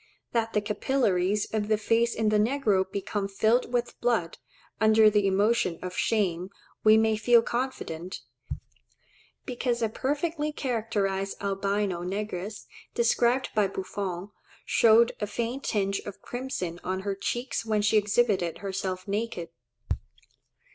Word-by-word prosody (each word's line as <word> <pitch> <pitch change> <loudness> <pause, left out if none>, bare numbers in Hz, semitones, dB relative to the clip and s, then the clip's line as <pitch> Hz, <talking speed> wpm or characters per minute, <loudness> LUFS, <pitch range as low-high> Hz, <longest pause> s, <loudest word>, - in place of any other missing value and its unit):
That 225 -1 0
the 210 - +2
capillaries 210 -3 +1
of 210 -1 0
the 215 0 +2
face 230 +2 +1
in 220 -1 +1
the 210 0 +3
negro 210 -5 +1
become 200 0 -2
filled 220 +5 +1
with 240 -1 -2
blood, 225 -9 0 0.4
under 220 0 +6
the 205 -1 +3
emotion 195 -2 +2
of 180 0 -5
shame, 185 -5 0 0.3
we 215 0 +7
may 220 0 +3
feel 235 +1 +5
confident; 200 -9 -4 1.2
because 245 -2 -1
a 225 - +2
perfectly 295 +5 -1
characterized 205 -8 -2
albino 195 -2 -1
negress, 200 +2 -4 0.3
described 240 +2 +2
by 210 -2 +3
Buffon, 190 0 -5 0.3
showed 230 +1 +5
a 210 - 0
faint 235 +6 -3
tinge 195 -2 0
of 205 - -9
crimson 245 -9 -4
on 190 +1 -2
her 200 0 -2
cheeks 240 +7 -3
when 215 -2 0
she 210 +1 +3
exhibited 205 -4 +1
herself 190 -1 -4
naked. 200 -4 -3
210 Hz, 130 wpm, -27 LUFS, 195-235 Hz, 1.2 s, we